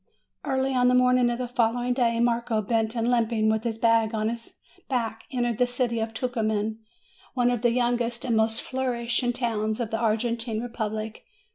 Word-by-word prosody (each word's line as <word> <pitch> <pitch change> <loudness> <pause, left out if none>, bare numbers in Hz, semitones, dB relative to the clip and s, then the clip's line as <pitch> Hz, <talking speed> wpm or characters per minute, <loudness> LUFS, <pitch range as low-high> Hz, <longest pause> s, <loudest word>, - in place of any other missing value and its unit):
Early 265 0 0
on 250 -1 +3
the 250 - +4
morning 250 -1 +4
of 240 - -1
the 250 0 -3
following 245 0 +1
day, 235 -2 +1
Marco, 235 -1 +1
bent 225 +2 0
and 235 +1 +1
limping, 225 -2 +2
with 220 0 -1
his 230 -2 -2
bag 225 -1 +3
on 215 0 0
his 230 0 -7 0.3
back, 230 -4 -2
entered 240 -3 -1
the 250 - +4
city 245 -2 0
of 225 0 -2
Tucuman, 220 -2 -1 0.6
one 245 -1 +3
of 240 -3 -1
the 240 - +4
youngest 240 0 0
and 235 -3 +1
most 220 +1 +1
flourishing 245 -2 -1
towns 220 -3 -1
of 230 -3 -3
the 225 - -1
Argentine 230 0 0
Republic. 220 -2 -4
235 Hz, 180 wpm, -26 LUFS, 225-245 Hz, 0.6 s, the